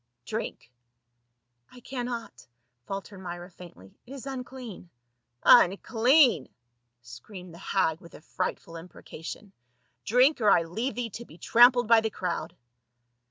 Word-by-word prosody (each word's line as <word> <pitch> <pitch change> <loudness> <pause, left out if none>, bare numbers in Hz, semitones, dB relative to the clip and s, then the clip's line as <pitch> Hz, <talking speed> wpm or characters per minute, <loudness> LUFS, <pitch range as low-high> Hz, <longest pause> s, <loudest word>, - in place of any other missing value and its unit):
" 120 - -53
Drink." 215 - -6 1.0
"I 250 - -14
cannot," 240 - -6 0.4
faltered 195 0 -6
Myra 175 0 -8
faintly, 165 - -14
"it 265 - -10
is 275 -1 -9
unclean." 255 -8 -8 0.5
"Unclean!" 235 - +5 0.5
screamed 170 - -11
the 170 - -12
hag 180 -5 0
with 170 - -14
a - - -13
frightful 165 +1 -5
im 165 +2 -11
precation. 175 +6 -10 0.3
" - - -45
Drink, 255 +3 +4
or 210 - +4
I 175 -4 +5
leave 225 +11 -4
thee 235 -2 -4
to 235 +5 -8
be 160 - -16
trampled 245 +3 +5
by 230 0 +6
the 220 - -1
crowd 180 -4 -4
205 Hz, 140 wpm, -27 LUFS, 175-245 Hz, 1.0 s, by